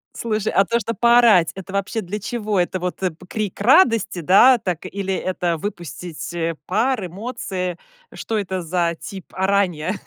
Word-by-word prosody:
Слушай, 215 Hz, -2 st, -2 dB
а 195 Hz, -, +4 dB
то, 235 Hz, +4 st, 0 dB
что 230 Hz, +1 st, -3 dB
поорать- 235 Hz, -6 st, +5 dB
это 190 Hz, 0 st, -9 dB
вообще 200 Hz, +3 st, -1 dB
для 205 Hz, +2 st, -5 dB
чего? 210 Hz, -2 st, -2 dB
Это 180 Hz, +1 st, 0 dB
вот, 180 Hz, +1 st, -4 dB
э, 185 Hz, -2 st, 0 dB, 0.2 s
крик 210 Hz, -3 st, -4 dB
радости, 230 Hz, -, +4 dB
да, 200 Hz, -, +6 dB
так, 180 Hz, -4 st, -4 dB
или 195 Hz, 0 st, -3 dB
это 180 Hz, -3 st, -1 dB
выпустить, 170 Hz, -1 st, -6 dB
э, 165 Hz, -1 st, -2 dB
пар, 220 Hz, +1 st, 0 dB
эмоции, 185 Hz, -2 st, -4 dB, 0.4 s
что 225 Hz, -, -3 dB
это 190 Hz, -2 st, -2 dB
за 170 Hz, 0 st, 0 dB
тип 190 Hz, -2 st, -8 dB
оранья? 190 Hz, -3 st, 0 dB
190 Hz, 160 wpm, -21 LUFS, 180-215 Hz, 0.4 s, да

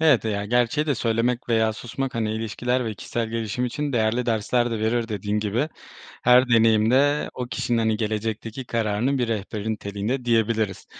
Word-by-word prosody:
Evet 150 Hz, -8 st, +4 dB
ya, 100 Hz, -2 st, -1 dB
gerçeği 120 Hz, +7 st, +1 dB
de 145 Hz, -, +2 dB
söylemek 120 Hz, +1 st, 0 dB
veya 110 Hz, -1 st, +2 dB
susmak, 125 Hz, +4 st, -5 dB
hani, 110 Hz, -2 st, -1 dB
ilişkiler 120 Hz, +3 st, -1 dB
ve 110 Hz, -2 st, -3 dB
kişisel 115 Hz, +3 st, -3 dB
gelişim 115 Hz, +1 st, -2 dB
için 145 Hz, +3 st, -2 dB
değerli 115 Hz, +1 st, +1 dB
dersler 120 Hz, +2 st, +1 dB
de 115 Hz, -, -2 dB
verir. 115 Hz, +1 st, 0 dB
Dediğin 105 Hz, 0 st, -2 dB
gibi, 110 Hz, +8 st, -1 dB, 0.5 s
her 125 Hz, +1 st, +6 dB
deneyimde 115 Hz, +6 st, +3 dB
o 125 Hz, -1 st, -4 dB
kişinin 120 Hz, -1 st, -1 dB
hani 110 Hz, -1 st, +1 dB
gelecekteki 110 Hz, +3 st, -3 dB
kararının 115 Hz, +4 st, 0 dB
bir 120 Hz, -, 0 dB
rehberin 110 Hz, 0 st, -2 dB
niteliğinde 105 Hz, +5 st, -3 dB
diyebiliriz. 110 Hz, -3 st, 0 dB
115 Hz, 165 wpm, -24 LUFS, 110-125 Hz, 0.5 s, her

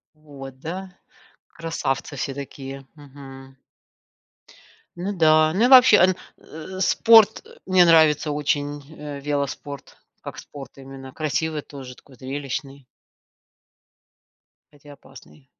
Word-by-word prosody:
Вот, 135 Hz, -4 st, -12 dB
да, 185 Hz, +3 st, -7 dB, 0.6 s
красавцы 155 Hz, -4 st, -4 dB
все 135 Hz, -, -3 dB
такие. 135 Hz, -1 st, -9 dB
Мгм. 135 Hz, -2 st, -13 dB, 1.4 s
Ну 185 Hz, +3 st, -3 dB
да. 155 Hz, -3 st, +4 dB
Ну, 210 Hz, +7 st, +2 dB
и -, -, +5 dB
вообще, 230 Hz, -8 st, +7 dB, 0.2 s
э, 175 Hz, +4 st, -10 dB
спорт, 220 Hz, +2 st, +5 dB, 0.2 s
мне 185 Hz, -1 st, +5 dB
нравится 160 Hz, -3 st, +4 dB
очень, 145 Hz, 0 st, -2 dB, 0.2 s
э, 145 Hz, -1 st, -7 dB
велоспорт, 140 Hz, -1 st, -5 dB, 0.2 s
как -, -, -9 dB
спорт 140 Hz, -2 st, -11 dB
именно 135 Hz, -1 st, -11 dB
красивый 155 Hz, +1 st, -2 dB
тоже, 130 Hz, -3 st, -11 dB
такой 135 Hz, -, -19 dB
зрелищный. 135 Hz, +1 st, -6 dB, 1.9 s
Хотя 145 Hz, 0 st, -15 dB
опасный. 135 Hz, 0 st, -17 dB
145 Hz, 105 wpm, -23 LUFS, 135-165 Hz, 1.9 s, вообще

